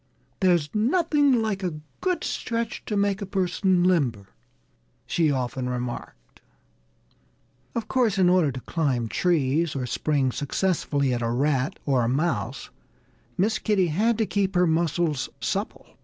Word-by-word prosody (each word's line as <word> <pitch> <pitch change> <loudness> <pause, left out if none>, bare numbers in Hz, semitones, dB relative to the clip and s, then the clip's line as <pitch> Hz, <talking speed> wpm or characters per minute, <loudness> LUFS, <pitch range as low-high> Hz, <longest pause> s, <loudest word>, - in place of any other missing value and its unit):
"There's 175 -6 +2
nothing 285 +1 +3
like 205 -3 -2
a 180 -4 -2 0.3
good 365 -1 0
stretch 230 -1 -3
to 210 - -2
make 200 0 +1
a - - -2
person 185 -1 +1
limber," 130 - +1 0.8
she 165 -3 +1
often 130 -2 -2
remarked. 120 - -6 1.3
Of 230 -2 -2
course, 235 -6 +1
in 185 -2 +4
order 175 -5 +4
to 130 0 -7
climb 135 -8 -1
trees, 160 -1 +1
or 130 -2 -2
spring 135 +1 0
successfully 145 -2 0
at 120 - -2
a 115 - 0
rat 135 - 0
or 135 -3 +2
a 115 - +1
mouse, 130 -4 -2 0.7
Miss 210 +4 +1
Kitty 195 -5 +1
had 215 +8 +1
to 225 - +1
keep 200 -2 -1
her 180 0 +4
muscles 160 -3 0
supple. - - -3
170 Hz, 140 wpm, -25 LUFS, 135-200 Hz, 1.3 s, in